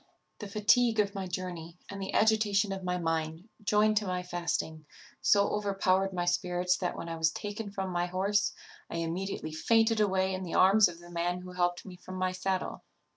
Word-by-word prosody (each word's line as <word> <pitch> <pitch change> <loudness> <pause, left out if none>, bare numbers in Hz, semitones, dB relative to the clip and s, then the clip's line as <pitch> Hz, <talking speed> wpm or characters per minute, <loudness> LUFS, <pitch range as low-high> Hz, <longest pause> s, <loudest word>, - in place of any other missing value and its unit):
The 210 - -6
fatigue 220 +3 +3
of 200 -1 +2
my 195 -2 -4
journey, 175 -2 -5
and 195 0 -7
the 190 - -4
agitation 210 -2 +3
of 190 -1 -4
my 180 0 -1
mind, 165 +1 -2 0.2
joined 210 +1 +3
to 205 -1 +1
my 180 0 -2
fasting, 165 -3 -3 0.3
so 200 -1 +4
overpowered 195 -2 +1
my 175 -2 -2
spirits, 180 0 +1
that 180 - -3
when - - -6
I 165 0 -4
was 160 0 +3
taken 205 +5 -5
from 195 -1 -4
my 175 0 0
horse 200 +3 +1 0.4
I - - -6
immediately 170 0 -3
fainted 225 +7 +2
away 190 -2 +2
in 185 - -3
the 180 -3 -4
arms 195 +2 +6
of 175 -1 -8
the 175 0 -13
man 175 +1 -1
who 180 0 -9
helped 175 -1 -1
me 185 -2 -10
from 185 +1 -9
my 185 0 0
saddle. 185 0 -3
185 Hz, 195 wpm, -30 LUFS, 175-205 Hz, 0.4 s, arms